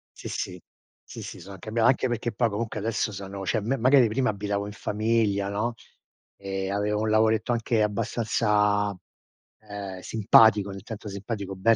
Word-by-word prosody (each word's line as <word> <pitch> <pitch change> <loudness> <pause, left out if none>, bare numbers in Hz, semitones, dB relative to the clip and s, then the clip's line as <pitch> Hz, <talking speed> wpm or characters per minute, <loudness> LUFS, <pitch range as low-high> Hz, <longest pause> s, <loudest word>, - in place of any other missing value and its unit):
Sì, - - -8
sì. 90 -1 -4 0.4
Sì, - - -9
sì, - - -8
sono 100 - -10
anche 105 +3 -9
brav 115 0 +2
anche 130 0 +3
perché 120 0 -2
poi 120 -2 +1
comunque 110 +2 -3
adesso 110 0 -1
sono 95 0 -6
cioè, 100 +6 0
me 125 +6 -1
magari 125 -1 +5
prima 125 +3 +1
abitavo 100 0 -2
in 105 - -7
famiglia 105 -1 0
no, 105 +4 -1 0.6
e 95 -1 -4
avevo 105 +1 0
un 110 - 0
lavoretto 110 +2 +2
anche 115 -1 +1
abbastanza, 105 -1 +1 0.7
ehm, 100 -3 -7
simpatico, 105 -1 +5
nel 95 -1 -8
senso 110 -1 -7
simpatico, 100 -1 -5
ben 115 +5 +4
105 Hz, 170 wpm, -26 LUFS, 100-115 Hz, 0.7 s, magari